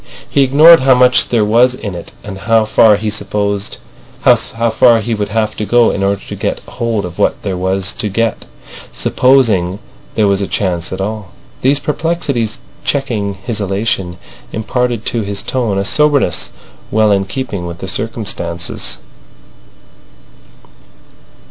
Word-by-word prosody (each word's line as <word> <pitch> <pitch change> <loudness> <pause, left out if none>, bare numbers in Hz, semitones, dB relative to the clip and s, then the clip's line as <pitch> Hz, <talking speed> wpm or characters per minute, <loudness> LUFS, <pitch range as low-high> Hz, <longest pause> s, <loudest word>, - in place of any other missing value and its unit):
He 140 - +1
ignored 150 +5 +7
how 130 0 +4
much 125 0 +4
there 115 -3 +2
was 120 +4 +3
in 105 -6 -6
it 85 - -8
and 100 -2 -8
how 110 +1 +2
far 110 0 +5
he 105 +2 -5
would 100 -1 -2 1.5
have 110 0 -1
to 105 - -2
go 120 -1 +4
in 100 - -3
order 100 0 0
to - - -6
get - - -2
hold 115 -5 -3
of 90 -1 -9
what - - +1
there 95 -2 -2
was 95 +1 -1
to 105 -3 -1
get—supposing 105 - 0 0.4
there 110 -2 +3
was 100 0 +1
a 100 - -2
chance 90 -4 -2
at 95 - -4
all. 105 -1 -4 0.3
These 135 +3 +3
perplexities 145 -6 -2 0.3
checking 115 -8 -1
his 105 +3 -4
elation 95 -3 -2 0.3
imparted 120 +1 -2
to 115 - -1
his 100 -1 -4
tone 115 -7 -1
a 100 - -1
soberness 145 -7 +2 0.4
well 110 -1 +3
in 100 -1 +2
keeping 100 -4 -4
with 85 0 -7
the 95 - -7
circumstances. 95 -6 -3
105 Hz, 140 wpm, -14 LUFS, 95-125 Hz, 1.5 s, ignored